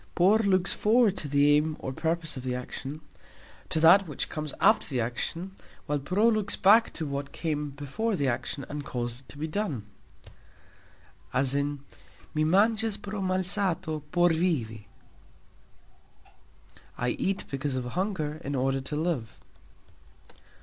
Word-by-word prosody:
"Por" 195 +5 +5
looks 195 -3 +2
"forward" 220 -2 +3
to 150 - -3
the 145 +1 +4
aim 155 +1 +1
or 130 - -5
purpose 165 +2 -1
of 130 - -5
the 125 0 -2
action, 135 +4 -6 0.7
to 160 - +3
that 175 +4 +7
which 150 - -3
comes 155 -2 -4
after - - +4
the 130 -5 -2
action, 145 +10 -3 0.3
while 150 0 -1
"pro" 185 +11 +2
looks 215 -3 +2
"back" 220 +4 +5
to 160 - -4
what 140 -1 -4
came 150 -3 -2
before 145 +11 -3
the 140 -6 0
action 130 +3 -2
and 145 0 -5
caused 120 -2 -4
it 130 - -22
to - - -10
be 150 - -3
done, 155 - -3 1.5
as 135 +1 +2
"Mi 140 0 -1 0.6
mangxas" 215 +5 +2
pro 205 0 -5
"malsato" 185 -3 0
por 175 0 +4
"vivi", 135 - -1 2.1
I 120 - 0
eat 195 +10 -1
because 135 0 -2
of 130 -1 -2
hunger 155 - -2
in 140 +1 -3
order 135 +1 0
to 135 +3 -5
live. 150 -8 -2
155 Hz, 145 wpm, -28 LUFS, 140-190 Hz, 2.1 s, that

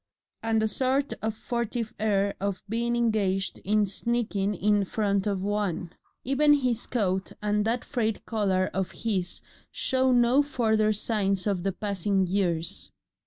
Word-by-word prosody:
and 225 -1 +1
a - - +3
sort 265 +5 +1
of 220 0 -2
furtive 235 0 -3
air 200 -2 +1
of 200 -1 -3
being 235 +2 0
engaged 205 -5 0
in 210 +1 +2
sneaking 205 -1 -1
in 205 +2 +2
front 200 0 0
of 195 -2 -1
one; 200 -4 -2 0.3
even 295 +3 +4
his 250 -4 0
coat 190 -5 -1
and 210 0 0
that 235 +2 0
frayed 225 -5 -2
collar 195 -4 0
of 190 -1 -1
his 190 -6 -2 0.3
show 260 0 +1
no 245 +2 +5
further 220 -6 +1
signs 200 -3 0
of 200 -4 0
the 195 +2 0
passing 195 -1 0
years. 175 -3 -1
210 Hz, 145 wpm, -27 LUFS, 195-235 Hz, 0.3 s, no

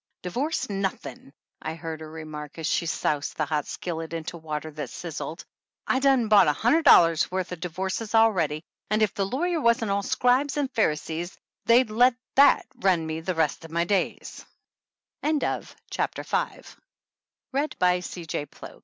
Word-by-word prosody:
"Divorce 260 - -2
nothin'," 195 -8 -4 0.3
I 160 - -4
heard 165 -1 -6
her 155 - -8
remark 155 -2 -8
as 160 - -4
she 170 +1 0
soused 150 -3 -1
the 155 - +1
hot 150 -1 -2
skillet 165 -2 -5
into 165 +1 -5
water 155 -1 -5
that 145 -4 -6
sizzled, 160 -2 -6 0.4
"I 260 - +1
done 265 -4 +3
bought 205 -5 +6
a 150 - +4
hundred 245 - +2
dollars' 165 -2 +6
worth 185 -1 -3
o' - - -2
divorces 190 +6 -3
already, 175 -9 +3 0.3
and 215 +1 +2
if 210 - +1
the 195 -1 -1
lawyers 330 - -1
wasn't 235 -3 +2
all 200 0 +1
scribes 255 +7 +1
and 280 -3 -1
Pharisees 165 -2 -1 0.3
they'd 235 -1 +4
let 245 +3 +4 0.2
that 280 +1 +6 0.3
run 165 -1 -4
me 160 0 -4
the 180 +2 -2
rest 160 -1 0
180 Hz, 135 wpm, -26 LUFS, 160-225 Hz, 0.4 s, bought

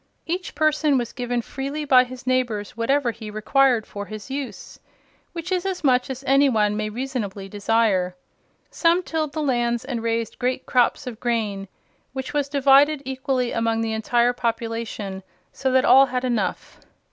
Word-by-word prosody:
Each 355 +1 -4
person 305 -1 +2
was 240 -2 -3
given 245 -1 -2
freely 280 +5 -4
by 255 -3 +6
his 250 0 -10
neighbors 245 -6 -1
whatever 245 +2 +1
he 220 -1 -9
required 235 +2 +2
for 205 0 -7
his 215 +4 -8
use, 275 -1 -6 0.5
which 340 +1 -6
is 365 -1 +1
as 380 -3 -3
much 255 -2 +3
as 265 0 -6
any 275 +1 +4
one 210 -3 +2
may 215 0 -2
reasonably 215 -5 -4
desire. 200 -3 +1 0.6
Some 340 +1 +2
tilled 315 -4 -2
the 310 -1 -2
lands 240 -3 0
and 250 -4 -3
raised 230 -1 -2
great 255 +1 -1
crops 250 +1 +2
of 235 -3 -7
grain, 215 -5 -2 0.5
which 265 -1 -5
was 290 -1 0
divided 280 +1 +4
equally 260 -1 -1
among 225 0 0
the 225 -1 -1
entire 235 +2 +2
population, 230 -4 -3 0.3
so 265 -1 -1
that 260 0 +3
all 270 +1 +7
had 255 0 -2
enough. 240 -3 -2
250 Hz, 165 wpm, -23 LUFS, 225-275 Hz, 0.6 s, all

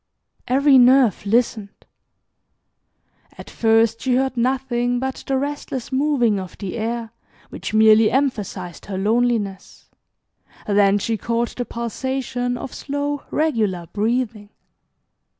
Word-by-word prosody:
Every 270 +1 +5
nerve 245 -5 +4
listened. 220 -2 -1 1.5
At - - -11
first 225 0 +2
she 255 -2 +1
heard 265 0 0
nothing 245 0 0
but 265 +1 -4
the 270 - +1
restless 275 -2 -4
moving 260 -6 +1
of 185 -2 -9
the 195 -3 -5
air, 230 0 -3 0.4
which - - -6
merely 220 0 +6
emphasized 205 - -2
her 195 -2 -4
loneliness, 210 -2 -1 0.7
then 200 -1 +3
she 225 +2 -2
caught 235 +2 -2
the 245 - -3
pulsation 245 +1 -3
of 255 - -7
slow 285 0 -4
regular 215 - 0
breathing. 220 -1 -1
235 Hz, 115 wpm, -21 LUFS, 215-260 Hz, 1.5 s, merely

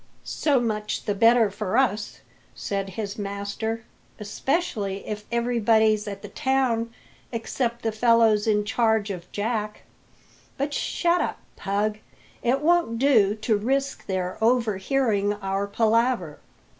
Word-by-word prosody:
"So 285 -4 +1
much 215 -3 -2
the 205 - 0
better 230 +1 +4
for 210 +2 -2
us," 215 -6 0 0.3
said 195 -1 -3
his 205 +2 -5
master; 200 +3 -4 0.4
"especially 210 - -2
if 210 0 -5
everybody's 225 -3 +2
at 200 0 -6
the - - -6
town 250 -2 0 0.4
except 235 0 -2
the 225 - 0
fellows 225 -1 +3
in 210 -1 +2
charge 220 -1 +1
of 180 -2 -8
Jack. 210 0 -3 0.7
But 285 +2 -2
shut 345 +3 +1
up, - - -2 0.2
Pug; 210 +2 -1 0.4
it 255 +3 +1
won't 335 -7 +2
do 225 -6 +4
to 220 0 0
risk 270 +6 -1
their 185 -1 -2
overhearing 220 -2 +1
our 195 -1 -2
palaver." 225 -5 +1
220 Hz, 125 wpm, -25 LUFS, 205-240 Hz, 0.7 s, better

